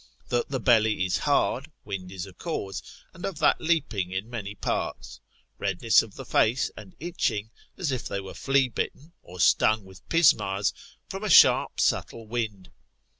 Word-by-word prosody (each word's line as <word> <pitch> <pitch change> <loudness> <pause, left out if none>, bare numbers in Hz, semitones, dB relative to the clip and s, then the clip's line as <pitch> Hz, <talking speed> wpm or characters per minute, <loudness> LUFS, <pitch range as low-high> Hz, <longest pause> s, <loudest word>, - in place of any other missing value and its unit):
That 120 -1 0
the 135 -1 -2
belly 110 -5 +3
is 90 - 0
hard, 140 0 +1 0.2
wind 95 -3 -6
is 95 -1 -5
a 95 - -12
cause, 100 - -4 0.3
and 175 - -12
of 195 -5 -3
that - - +3
leaping 150 - 0
in 95 +5 -4
many 105 -4 -5
parts. - - -3 0.4
Redness - - +3
of - - -11
the - - -8
face, 115 +4 +2
and 185 - -12
itching, 115 - -2 0.3
as 160 -6 -1
if 130 -3 -3
they 100 - -3
were 95 -1 -8
flea 135 -1 +2
bitten, 140 +6 -5
or 90 +1 -12
stung 110 +3 +3
with 95 0 -16
pismires, 130 - +3 0.3
from - - -6
a - - -1
sharp - - +6
subtle 115 - 0
wind. 110 -5 -4
110 Hz, 170 wpm, -26 LUFS, 100-140 Hz, 0.4 s, sharp